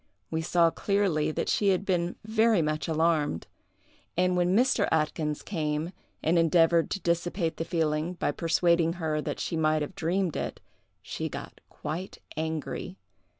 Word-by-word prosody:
We 160 0 0
saw 170 0 +3
clearly 195 -7 +1
that 155 - -2
she 205 - +2
had 195 0 +2
been 175 -2 0
very 220 -4 +3
much 155 0 -1
alarmed; 160 - +1 0.7
and 180 0 +3
when 180 +2 +3
Mr. 245 -4 +3
Atkyns 155 -1 0
came, 155 -2 -2 0.3
and 170 +2 +3
endeavored 165 0 +4
to 195 - -2
dissipate 170 0 -1
the 165 - -2
feeling 160 0 0
by 160 - 0
persuading 165 +1 +2
her 160 -3 -1
that - - -4
she - - -2
might 155 -1 +2
have 150 - -6
dreamed 180 -1 0
it, - - -3 0.4
she - - -4
got - - -8
quite 165 +6 -5 0.2
angry. 160 +4 -4
165 Hz, 150 wpm, -28 LUFS, 155-180 Hz, 0.7 s, endeavored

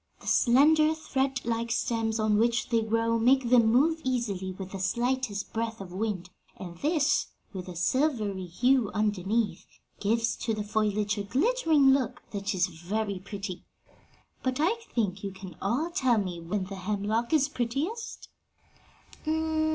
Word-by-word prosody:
The - - -16
slender, 305 +5 +4
thread 270 -5 -2
like 230 0 -1
stems 225 -1 0
on 215 -1 +2
which 235 +1 +1
they 230 -2 +2
grow 230 +1 +1
make 250 +1 +3
them 235 -3 +6
move 320 +7 +3
easily 215 -8 -1
with 185 0 -8
the 195 - -5
slightest 240 0 -1
breath 225 0 -2
of 185 -2 -8
wind, 190 -3 -3 0.3
and 175 -3 -8
this, 305 -1 +2 0.3
with 185 -2 -6
the 180 - -7
silvery 210 - 0
hue 245 +5 +2
underneath, 210 +1 0 0.4
gives 230 +3 +1
to 225 -2 -1
the 210 - -3
foliage 210 0 0
a - - -2
glittering 300 - +3
look 265 -3 0
that 200 -1 -2
is 180 -1 +3
very 190 +4 -3
pretty. 195 -1 -6 0.8
But 260 0 -1
I 335 +8 +3 0.2
think 200 -4 0
you 195 -1 -5 0.3
all 255 - 0
can - - -24
tell 260 -8 +3
me 185 -4 -2
when 180 +4 -2
the 195 +1 -7
hemlock 210 +4 -1
is 300 -3 +4
prettiest?" 290 - -3
225 Hz, 150 wpm, -28 LUFS, 200-260 Hz, 0.8 s, them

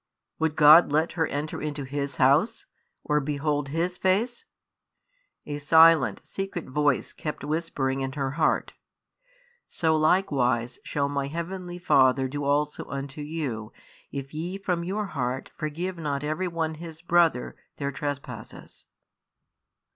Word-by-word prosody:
Would 160 -1 0
God 155 +1 +8
let 155 +3 +2
her 160 -2 0
enter 145 +2 -4
into 150 -1 -3
His 140 0 -3
house, 145 - +3 0.4
or 150 0 +2
behold 145 0 -1
His 170 +4 -2
face? 215 +6 +1 1.0
A 145 0 -4
silent, 160 -1 +5
secret 195 -3 -5
voice 145 0 0
kept 150 -3 -5
whispering 145 -3 -1
in 135 0 -3
her 135 -2 -2
heart, 155 +2 +1 0.9
"So 160 -1 +1
likewise 130 -8 +1
shall 140 -1 -1
My 140 -1 -2
Heavenly 175 +3 -5
Father 130 -6 +4
do 145 +2 -4
also 145 +1 0
unto 140 +1 -6
you, 145 -8 -4 0.4
if 135 0 -6
ye 170 +5 -4
from 180 -3 -1
your 200 +4 -2
heart 130 -7 -3
forgive 170 +4 -4
not 145 -3 -2
every 155 +5 -1
one 165 -2 -2
his 165 -1 -9
brother 170 -6 +2 0.2
their 140 -1 -3
trespasses." 145 0 -7
150 Hz, 130 wpm, -26 LUFS, 140-165 Hz, 1.0 s, God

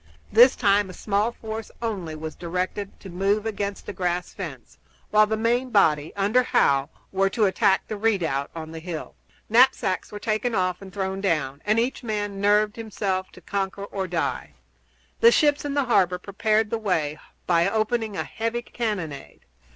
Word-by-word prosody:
This 240 +4 +7
time 205 -3 +3
a - - -8
small 210 +4 0
force 220 -1 -6
only 195 -9 -3
was 155 0 -6
directed 185 +3 -4
to 195 - -9
move 200 +4 +1
against 200 -2 -3
the - - -5
grass 180 -1 -2
fence, - - -8 0.3
while 215 0 +5
the 220 +1 -1
main 240 +3 +1
body, 160 -9 +3
under 205 +5 +3
Howe, 140 - +2 0.2
were 195 0 +2
to 215 +2 +2
attack 190 0 +2
the 215 - -4
redoubt 175 -11 0
on 160 -1 -6
the 165 - -7
hill. 165 -1 -6 0.3
Knapsacks 225 -5 +3
were 210 - -6
taken 215 +2 -1
off 185 0 0
and 195 -1 -10
thrown 190 0 -3
down, 150 -7 -1
and 215 +2 +3
each 245 +3 -1
man 205 -4 -3
nerved 210 +1 +3
himself 195 -4 -2
to - - -14
conquer 200 0 -3
or 195 -2 -4
die. 170 -2 -2 0.6
The 465 +1 +7
ships 295 -5 +3
in 285 -1 -2
the 285 -2 +2
harbor 185 -7 +3
prepared 215 +3 0
the 230 - -1
way 160 -8 -1 0.3
by 170 +1 +3
opening 220 0 -1
a - - -1
heavy 230 +1 -3
cannonade. 185 - -5
200 Hz, 175 wpm, -25 LUFS, 180-220 Hz, 0.6 s, This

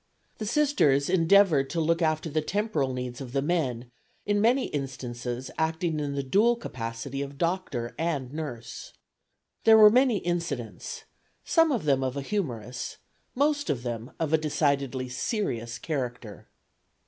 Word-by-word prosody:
The 215 - -3
Sisters 200 - +2
endeavored 165 -5 +4
to 170 - -2
look 165 +2 +1
after 155 0 +1
the 155 0 0
temporal 165 -6 -1
needs 125 0 -5
of 130 -2 -8
the 135 - +1
men, 130 -8 -1 0.3
in 205 0 +1
many 250 +4 +3
instances 125 -2 -5
acting 160 0 0
in 145 -1 -2
the 140 - -1
dual 210 - +3
capacity 130 - -5
of 140 0 -6
doctor 165 -8 -2
and 145 -6 -2
nurse. 145 -7 -6 0.7
There 225 0 +8
were 210 -1 +9
many 250 -1 +4
incidents, 170 - -4 0.4
some 325 -2 +4
of 240 - 0
them 135 -2 +2
of 130 +1 -2
a 140 - -3
humorous, 125 - -4 0.4
most 290 +2 +1
of 120 -4 -1
them 120 0 -4
of 160 -1 -1
a 160 - +5
decidedly 140 -4 0
serious 120 - -2
character. 125 -6 -5
145 Hz, 150 wpm, -27 LUFS, 125-185 Hz, 0.7 s, were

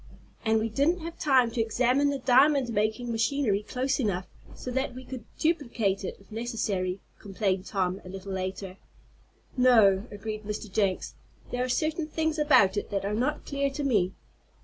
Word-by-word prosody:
"And 220 0 +3
we 220 - 0
didn't 290 +10 +1
have 335 +1 -7
time 260 -5 +4
to 230 0 0
examine 250 +5 +2
the 280 - -1
diamond 265 +1 +4
making 215 +3 0
machinery 230 -2 +1
close 260 +6 -1
enough 195 -7 -1 0.3
so 250 - -6
that 265 0 -1
we 255 0 -9
could 250 -3 -8
duplicate 235 - 0
it - - -5
if 195 - -21
necessary," 210 -5 -2 0.2
complained 195 -2 -2
Tom, 190 -1 -1
a 185 - -10
little 195 +1 -7
later. 190 0 -4 0.8
"No," 225 -5 +5
agreed 215 +1 -5
Mr. 210 0 -5
Jenks. 195 -2 0 0.4
"There 245 0 -1
are 255 - -2
certain 310 +4 0
things 320 0 -1
about 215 -10 +5
it 205 - -2
that 195 -1 -2
are 205 - -1
not 255 +7 -1
clear 280 -1 0
to 285 +2 -4
me. 200 -9 +1
230 Hz, 170 wpm, -28 LUFS, 200-270 Hz, 0.8 s, No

